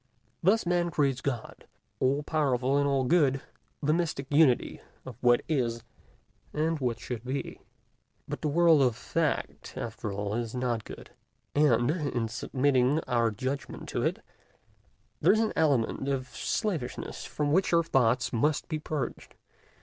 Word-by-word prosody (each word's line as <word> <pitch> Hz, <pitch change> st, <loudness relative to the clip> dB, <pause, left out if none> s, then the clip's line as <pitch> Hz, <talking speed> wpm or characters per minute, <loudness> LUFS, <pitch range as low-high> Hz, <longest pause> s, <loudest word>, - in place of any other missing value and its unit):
Thus 200 Hz, +5 st, +3 dB
Man 175 Hz, 0 st, +1 dB
creates 140 Hz, -5 st, 0 dB
God, 125 Hz, -5 st, -4 dB, 0.3 s
all 140 Hz, +3 st, +1 dB
powerful 135 Hz, -4 st, +1 dB
and 140 Hz, 0 st, +3 dB
all 135 Hz, -1 st, +2 dB
good, 140 Hz, -2 st, +3 dB, 0.4 s
the 150 Hz, +2 st, +3 dB
mystic 160 Hz, -5 st, -1 dB
unity 145 Hz, -4 st, +3 dB, 0.2 s
of 130 Hz, -, -8 dB
what 120 Hz, -1 st, +4 dB
is 120 Hz, -7 st, -1 dB, 0.7 s
and 160 Hz, +1 st, 0 dB
what 120 Hz, -3 st, -1 dB
should 120 Hz, -2 st, -5 dB
be. 130 Hz, +2 st, -4 dB, 0.7 s
But -, -, -5 dB
the -, -, 0 dB
world 165 Hz, 0 st, +5 dB
of 125 Hz, -4 st, +3 dB
fact, 150 Hz, +5 st, -2 dB
after 105 Hz, -, -4 dB
all, 100 Hz, +1 st, -3 dB
is 115 Hz, +1 st, -3 dB
not 120 Hz, -3 st, -1 dB
good; -, -, -10 dB, 0.4 s
and, 135 Hz, -4 st, +3 dB
in 140 Hz, -8 st, -1 dB
submitting 130 Hz, +3 st, +1 dB
our 120 Hz, -4 st, +1 dB
judgment 130 Hz, +6 st, -4 dB
to -, -, -2 dB
it, -, -, -1 dB, 0.9 s
there -, -, +5 dB
is 220 Hz, -, +2 dB
an 225 Hz, -1 st, +1 dB
element 140 Hz, -3 st, +1 dB
of 130 Hz, -2 st, -2 dB
slavishness 160 Hz, -, -3 dB
from 145 Hz, -1 st, -2 dB
which 185 Hz, +5 st, +2 dB
our 170 Hz, -1 st, +4 dB
thoughts 130 Hz, -4 st, +2 dB
must 145 Hz, +6 st, +1 dB
be 155 Hz, -2 st, -2 dB
purged. 150 Hz, -2 st, -5 dB
135 Hz, 150 wpm, -29 LUFS, 125-155 Hz, 0.9 s, world